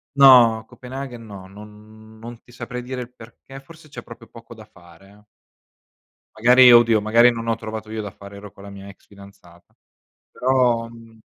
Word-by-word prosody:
No, 125 -5 +5
Copenaghen 125 -2 -10
no, 100 -3 -13
non 105 +2 -17
non 115 +1 -12
ti - - -22
saprei 120 +1 -9
dire 125 0 -7
il 125 0 -11
perché, 125 +3 -15
forse 160 +2 -19
c'è 145 - -11
proprio 115 - -15
poco 115 +1 -16
da 110 -1 -15
fare, 90 -2 -21
eh. 105 +1 -22 1.1
Magari 125 +2 +5
oddio, 115 -2 +4
magari 115 +3 +3
non 115 -1 -8
ho 115 - -1
trovato 110 -1 -9
io 110 0 -6
da 105 - -8
fare, 100 +1 -15
ero 100 0 -13
con 100 - -18
la 100 - -12
mia 100 0 -13
ex 100 - -17
fidanzata. 100 -4 -20 0.6
Però, 125 -3 -1
mhmm 115 -1 -17
115 Hz, 180 wpm, -20 LUFS, 105-120 Hz, 1.1 s, No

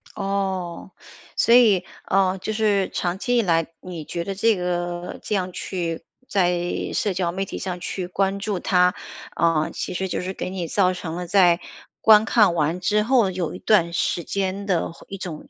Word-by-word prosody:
哦， 190 -3 -3 0.4
所 235 - +5
以 215 -7 +5 0.2
呃， 190 0 +2
就 215 +4 -3
是 210 -3 +1
长 175 0 -1
期 245 +4 0
以 - - +5
来， 165 -5 +1
你 170 -4 -7
觉 170 - -4
得 195 +2 -4
这 225 +3 +3
个 175 -1 -3
这 - - -3
样 185 -2 -1
去 170 -3 -4 0.2
在 180 -3 +1 0.3
社 205 - 0
交 175 -2 -1
媒 195 +2 -3
体 - - -6
上 180 -2 -4
去 180 +1 -4
关 195 +2 0
注 200 -2 -2
他， 180 0 +3 0.4
呃， 165 -2 +2
其 - - -4
实 190 +2 -1
就 180 - -2
是 185 +1 -4
给 - - -4
你 180 -3 -4
造 185 +1 +2
成 170 -2 -6
了 180 - -4
在 175 -1 +4 0.4
观 220 -1 +6
看 210 -6 +4
完 165 +1 0
之 210 +3 +2
后 225 -4 +3
有 180 -3 -3
一 - - -8
段 180 -6 +3
时 170 0 -1
间 195 +2 -3
的 175 -4 0
会 165 - -16
一 195 - -6
种 175 -5 -7
185 Hz, 205 characters per minute, -23 LUFS, 175-200 Hz, 0.4 s, 观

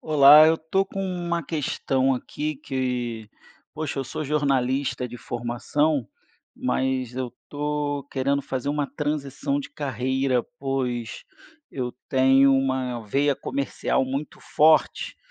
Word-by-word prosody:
Olá, 150 0 +8
eu 160 - +5
estou 165 +5 0
com 195 - -6
uma 175 -2 -2
questão 135 -3 0
aqui 150 +4 -4
que 125 -5 -3 0.5
poxa, 155 -2 -3
eu 135 - -1
sou 140 - -5
jornalista 135 -3 0
de 120 - -8
formação, 120 +4 -1 0.5
mas 130 -1 -1
eu 130 -1 -2
estou 145 +2 -3
querendo 140 +1 0
fazer 130 +1 -3
uma 145 0 0
transição 150 - -2
de 285 0 -6
carreira, 130 - -1
pois 125 -4 -3 0.5
eu 125 -2 -3 0.2
tenho 135 +1 +5
uma 130 -2 0
veia 140 +6 +2
comercial 135 0 -1
muito 135 +3 -4
forte 155 +1 +2
135 Hz, 120 wpm, -24 LUFS, 130-150 Hz, 0.5 s, Olá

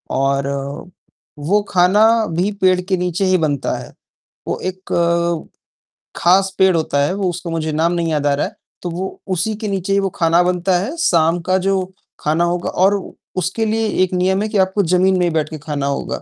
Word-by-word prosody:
और 135 +1 +1 0.9
वो 195 +8 +2
खाना 185 +4 +4 0.3
भी 190 +4 +1
पेड़ 185 -1 +4
के 185 +1 -1
नीचे 180 +1 -1
ही 185 -1 +3
बनता 145 -4 -1
है। - - -10 0.5
वो - - -2
एक, 170 -2 -1 0.7
खास 190 +2 +3
पेड़ 190 -2 +4
होता 155 -3 0
है, 165 - 0
वो 195 -2 -1
उसको 175 0 -5
मुझे 160 -1 -2
नाम 160 +3 +1
नहीं 170 -1 -1
याद 145 -2 0
आ 145 - +3
रहा 140 - 0
है, - - -8 0.3
तो 175 - -4
वो 185 +3 -5
उसी 190 +4 -1
के 215 -1 -4
नीचे 195 0 -1
ही 200 - +3
वो 195 -1 0
खाना 170 0 +3
बनता 180 0 +1
है, 260 - -4
शाम 170 - +2
का 185 +3 +1
जो 190 0 -1 0.3
खाना 155 +3 +1
होगा। 175 0 -1
और 195 +3 +3 0.4
उसके 185 +5 -1
लिए 220 0 0 0.2
एक 185 0 -2
नियम 190 +2 +1
है 215 - -2
कि 210 - -1
आपको 190 +2 +2
ज़मीन 185 +2 +3
में 180 - +2
ही - - +2
बैठ 155 -2 0
के 155 - -6
खाना 145 -2 -4
होगा, 140 - -3
180 Hz, 205 wpm, -18 LUFS, 165-190 Hz, 0.9 s, खाना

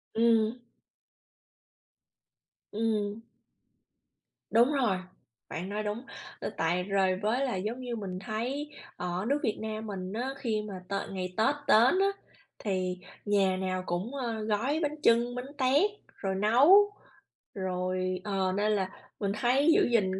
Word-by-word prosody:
Ừm. 225 0 +3 2.1
Ừm. 215 -1 -1 1.3
Đúng 240 +6 +5
rồi, 245 -9 +2 0.5
bạn 180 +4 -4
nói 210 +1 -2
đúng. 210 +4 -4 0.3
Ờ, - - -3
tại 170 +3 +1
rồi 190 -1 +2
với 235 +6 +1
là, 245 - -1
giống 215 +6 -3
như, 245 -2 -4
mình 190 -4 -5
thấy 245 +9 -3 0.3
ở 180 +2 -2
nước 285 +3 +2
Việt 215 - 0
Nam 220 0 -4
mình 190 -2 -5
á, 250 +4 -2
khi 220 -5 -1
mà 205 - -6 0.2
tợ 200 0 -2
ngày 185 -1 -4
Tết 270 +7 +3
đến 245 - +6
á, 395 - +4 0.5
thì 185 -3 -1 0.3
nhà 195 -2 +3
nào 185 -1 -2
cũng, 185 +10 -3
ơ, 230 -5 -3
gói 225 +8 0
bánh 295 0 0
chưng, 235 +1 +4
bánh 260 +3 -6
tét, 285 +10 +3 0.3
rồi 195 -1 -2
nấu, 280 - +6 0.6
rồi 185 -1 -2
ờ, 195 -2 0
nên 210 +1 +2
là 195 -3 0 0.3
mình 200 -2 0
thấy 270 +6 +4
giữ - - +4
gìn 190 -5 +2
215 Hz, 145 wpm, -29 LUFS, 190-245 Hz, 2.1 s, đến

